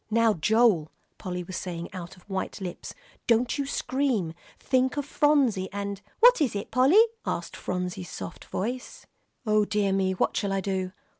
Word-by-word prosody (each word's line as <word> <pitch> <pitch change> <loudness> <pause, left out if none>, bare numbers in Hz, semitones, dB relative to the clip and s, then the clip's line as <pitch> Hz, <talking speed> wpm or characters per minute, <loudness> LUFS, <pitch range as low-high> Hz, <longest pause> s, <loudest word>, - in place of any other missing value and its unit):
"Now, 225 0 +4
Joel," 205 -3 +3 0.3
Polly 180 -2 -4
was 185 +1 -7
saying 175 -2 -5
out 180 -1 -8
of 180 - -21
white 190 -2 -3
lips, 180 -3 -6 0.3
"don't 235 +3 +2
you 280 - -1
scream. 255 - 0 0.2
Think 260 +1 +1
of 290 - -1
Phronsie, 275 -11 +2
and 200 0 -4
" - - -36
"What - - +7
is 260 -8 +1
it, 200 - -4
Polly?" 270 - +6 0.2
asked - - -3
Phronsie's 180 0 -4
soft 90 -2 -8
voice. 245 +6 -4 0.4
"O 215 -1 +3
dear 205 -2 +1
me! 190 -1 +1
What 185 - 0
shall 200 -1 0
I 195 - +1
do!" 190 -1 -2
200 Hz, 170 wpm, -27 LUFS, 185-250 Hz, 0.4 s, What